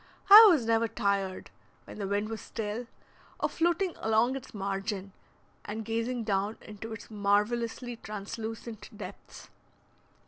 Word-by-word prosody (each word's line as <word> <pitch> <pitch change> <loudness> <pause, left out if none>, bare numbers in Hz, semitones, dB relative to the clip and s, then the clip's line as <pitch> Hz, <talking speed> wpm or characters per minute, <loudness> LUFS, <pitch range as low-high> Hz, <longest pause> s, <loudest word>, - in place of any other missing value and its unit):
I 435 +2 +13
was 305 - +3
never 230 0 +2
tired, 200 -2 -1 0.3
when - - -10
the 200 - -2
wind 205 +2 -1
was 225 -1 -5
still, 225 +2 -5 0.5
of - - 0
floating 345 +2 +1
along 225 +4 +2
its 265 -1 -8
margin 195 -1 -3 0.5
and 215 +1 -5
gazing 230 +2 -2
down 205 0 -1
into 215 +1 -9
its 220 0 -9
marvelously 225 +4 0
translucent 220 +2 -7
depths. 200 -1 -10
220 Hz, 130 wpm, -29 LUFS, 205-235 Hz, 0.5 s, I